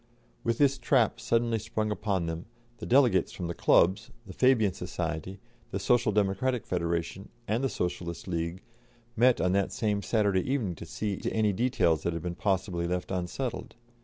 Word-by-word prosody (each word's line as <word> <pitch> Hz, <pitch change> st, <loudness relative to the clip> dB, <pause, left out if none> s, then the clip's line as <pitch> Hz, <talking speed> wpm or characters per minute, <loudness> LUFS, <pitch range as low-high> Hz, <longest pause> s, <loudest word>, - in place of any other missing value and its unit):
With 115 Hz, 0 st, 0 dB
this 140 Hz, -2 st, +3 dB
trap 120 Hz, -2 st, +2 dB
suddenly 115 Hz, 0 st, +1 dB
sprung 110 Hz, 0 st, -2 dB
upon 100 Hz, -4 st, -1 dB
them, 80 Hz, +2 st, -5 dB, 0.3 s
the -, -, -6 dB
delegates 120 Hz, -9 st, +4 dB
from 90 Hz, -, -6 dB
the 85 Hz, -, -3 dB
clubs, 95 Hz, +4 st, +3 dB, 0.2 s
the 95 Hz, -, -9 dB
Fabian 115 Hz, -6 st, +3 dB
Society, 85 Hz, +4 st, -4 dB, 0.3 s
the -, -, -3 dB
Social 120 Hz, -3 st, +2 dB
Democratic 105 Hz, +4 st, 0 dB
Federation, 85 Hz, +2 st, -2 dB, 0.2 s
and 115 Hz, +5 st, 0 dB
the 135 Hz, -, +1 dB
Socialist 85 Hz, -2 st, -4 dB
League, 85 Hz, +1 st, -3 dB, 0.5 s
met 125 Hz, +1 st, +4 dB
on 90 Hz, -, +2 dB
that 100 Hz, 0 st, +1 dB
same 105 Hz, -3 st, -1 dB
Saturday 100 Hz, -4 st, +1 dB
evening 115 Hz, -10 st, 0 dB
to 85 Hz, -, -10 dB
see 100 Hz, +2 st, -3 dB
to -, -, -3 dB
any 105 Hz, -2 st, +2 dB
details 95 Hz, -8 st, +2 dB
that 85 Hz, -, -1 dB
had 85 Hz, -1 st, -5 dB
been 90 Hz, -, -3 dB
possibly 90 Hz, -2 st, -1 dB
left 90 Hz, +1 st, -3 dB
unsettled. 95 Hz, +9 st, -4 dB
100 Hz, 170 wpm, -29 LUFS, 90-115 Hz, 0.5 s, delegates